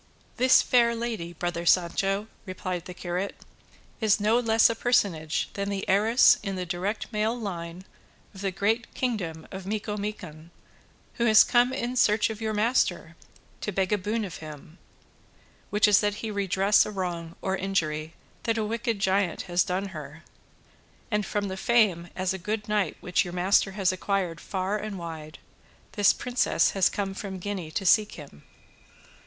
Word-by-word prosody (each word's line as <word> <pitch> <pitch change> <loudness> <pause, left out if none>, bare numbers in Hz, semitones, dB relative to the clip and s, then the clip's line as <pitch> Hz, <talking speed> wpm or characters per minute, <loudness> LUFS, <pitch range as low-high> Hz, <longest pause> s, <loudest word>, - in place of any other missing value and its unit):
"This 255 +1 +5
fair 235 -2 +3
lady, 230 -8 -4
brother 175 0 -3
Sancho," 195 +4 +2 0.2
replied 185 -1 -4
the 180 - -8
curate, 180 +3 -3 0.6
"is 215 -2 +3
no 215 +3 +3
less 225 -2 +4
a - - 0
personage 180 -10 0
than 200 0 -3
the 195 -1 -3
heiress 215 +6 +5
in 195 -2 -4
the 180 -1 -3
direct 185 +7 -3
male 215 +3 0
line 175 -3 -6 0.5
of 190 - -10
the 195 - 0
great 220 +5 -1
kingdom 185 -11 -3
of 190 -1 -7
Micomicon, 205 -6 -5 0.7
who - - +4
has 215 -2 +8
come 245 +1 +3
in 250 -1 -3
search 215 -2 +3
of 220 0 -8
your 220 -1 -1
master 220 +4 0 0.5
to 210 - -3
beg 190 +1 0
a - - +3
boon 210 +3 -2
of 180 - -7
him, 155 +2 -11 0.9
which 210 +1 +3
is 205 -1 +6
that 205 -1 0
he 220 +1 -5
redress 200 0 +3
a - - -5
wrong 175 -4 -4
or 190 0 -1
injury 160 -5 -2 0.3
that 230 -1 -1
a 220 - 0
wicked 230 +1 -2
giant 195 -2 0
has 175 -1 +1
done 195 +1 -2
her; 155 -2 -9 0.9
and 210 -1 0
from 205 -1 -2
the 190 - -4
fame 205 -7 +2
as 185 0 -1
a 190 - -5
good 210 +3 -3
knight 210 -2 0
which 180 - +1
your 175 -2 -7
master 190 +2 +2
has 190 -2 +1
acquired 185 -2 -2
far 195 +2 -2
and 210 -2 -5
wide, 160 -3 -8 0.5
this 205 -2 +4
princess 250 0 +1
has 195 -2 +3
come 195 -1 -3
from 195 -1 -6
Guinea 185 -3 -5
to 195 +5 -3
seek 210 +3 +4
him." 140 - -12
195 Hz, 170 wpm, -26 LUFS, 180-215 Hz, 0.9 s, has